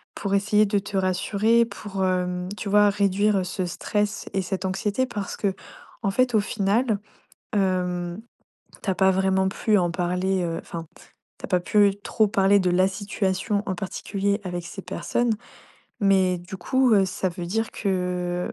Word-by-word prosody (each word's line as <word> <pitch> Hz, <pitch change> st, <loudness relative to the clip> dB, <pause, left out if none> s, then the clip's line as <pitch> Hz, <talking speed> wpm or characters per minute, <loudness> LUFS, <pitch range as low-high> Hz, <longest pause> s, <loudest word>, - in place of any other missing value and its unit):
pour 200 Hz, -1 st, -1 dB
essayer 210 Hz, +1 st, +3 dB
de 205 Hz, 0 st, +1 dB
te 200 Hz, 0 st, -8 dB
rassurer, 200 Hz, +5 st, +2 dB
pour, 195 Hz, -4 st, -4 dB
hem, 180 Hz, 0 st, -1 dB
tu 205 Hz, -, -4 dB
vois, 205 Hz, +1 st, +5 dB
réduire, 200 Hz, 0 st, +2 dB
heu, 185 Hz, -, -1 dB
ce 185 Hz, +1 st, -3 dB
stress 210 Hz, +4 st, -2 dB
et 195 Hz, -, +1 dB
cette 190 Hz, +1 st, -3 dB
anxiété. 200 Hz, +6 st, 0 dB
Parce 205 Hz, -5 st, -5 dB
qu'en 195 Hz, +1 st, -4 dB
fait, 250 Hz, +2 st, +2 dB
au -, -, +6 dB
final, 205 Hz, +2 st, 0 dB, 0.5 s
hem, 180 Hz, -2 st, 0 dB, 0.6 s
tu -, -, -2 dB
as 190 Hz, -, +1 dB
pas 190 Hz, 0 st, +4 dB
vraiment 190 Hz, 0 st, +2 dB
pu 210 Hz, +2 st, +1 dB
en 175 Hz, -2 st, +1 dB
parler, 180 Hz, +1 st, 0 dB
heu, 165 Hz, -1 st, -2 dB
enfin, 165 Hz, -1 st, -7 dB, 0.5 s
tu -, -, -18 dB
as -, -, -3 dB
pas 180 Hz, -2 st, +2 dB
pu 205 Hz, +3 st, +4 dB
trop 215 Hz, -, +2 dB
parler 195 Hz, 0 st, +4 dB
de 185 Hz, -1 st, +1 dB
la 185 Hz, +2 st, +4 dB
situation 200 Hz, +1 st, -1 dB
en 190 Hz, -, -1 dB
particulier 200 Hz, +2 st, -2 dB
avec 175 Hz, -2 st, -4 dB
ces 195 Hz, -, -8 dB
personnes. 240 Hz, +4 st, -1 dB, 0.7 s
Mais 190 Hz, -3 st, +3 dB
du 185 Hz, +3 st, -8 dB
coup, 260 Hz, +6 st, +2 dB
heu, 195 Hz, -2 st, +5 dB
ça 185 Hz, 0 st, -1 dB
veut 175 Hz, 0 st, -6 dB
dire 225 Hz, +5 st, -1 dB
que,, 180 Hz, -2 st, -2 dB
195 Hz, 170 wpm, -24 LUFS, 185-205 Hz, 0.7 s, au